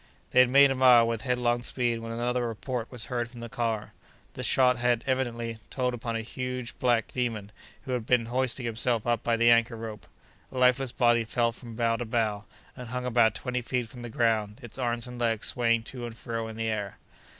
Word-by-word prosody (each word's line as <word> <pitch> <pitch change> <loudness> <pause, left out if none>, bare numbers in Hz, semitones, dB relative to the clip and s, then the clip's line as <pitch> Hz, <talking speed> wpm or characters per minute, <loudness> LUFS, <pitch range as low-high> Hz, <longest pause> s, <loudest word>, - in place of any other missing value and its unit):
They - - +4
had 125 -1 +7
made 140 +1 +7
a - - +2
mile 125 -3 +6
with 115 -1 -2
headlong 125 -1 0
speed, 120 -1 -1
when 115 0 -6
another 120 +1 -1
report 115 +2 -4
was 125 -3 -3
heard 120 -2 -2
from 120 -1 -12
the 115 0 -7
car. 115 -2 -2 0.4
The - - -6
shot 125 -2 +3
had, 120 -1 +1
evidently, 120 -4 -2
told 125 -1 -1
upon 115 -1 -4
a 115 - -1
huge 125 +1 -5
black 120 -3 +2
demon, 115 -5 -2 0.3
who 130 - -6
had 125 -3 -2
been 125 -2 +3
hoisting 125 +1 -1
himself 115 0 -1
up 120 -2 +1
by 115 -1 +1
the 115 +1 +5
anchor 115 0 +3
rope. 110 -2 -8 0.4
A 130 - -7
lifeless 125 0 +3
body 120 -2 +3
fell 115 +1 0
from 115 -1 -11
bough 115 0 +1
to 120 - -4
bough, 110 -2 -1 0.3
and 125 -2 -8
hung 125 +1 -3
about 115 -3 +3
twenty 125 -1 -3
feet 125 -1 -2
from 125 - -11
the 120 - -6
ground, 110 -2 0
its 120 +2 -7
arms 120 -2 -1
and 125 -1 -8
legs 115 -3 0
swaying 115 -2 +1
to 120 0 -6
and 115 -1 -10
fro 115 -1 -4
in 110 - -8
the 115 0 -2
air. 105 -3 -3
120 Hz, 215 wpm, -28 LUFS, 115-125 Hz, 0.4 s, had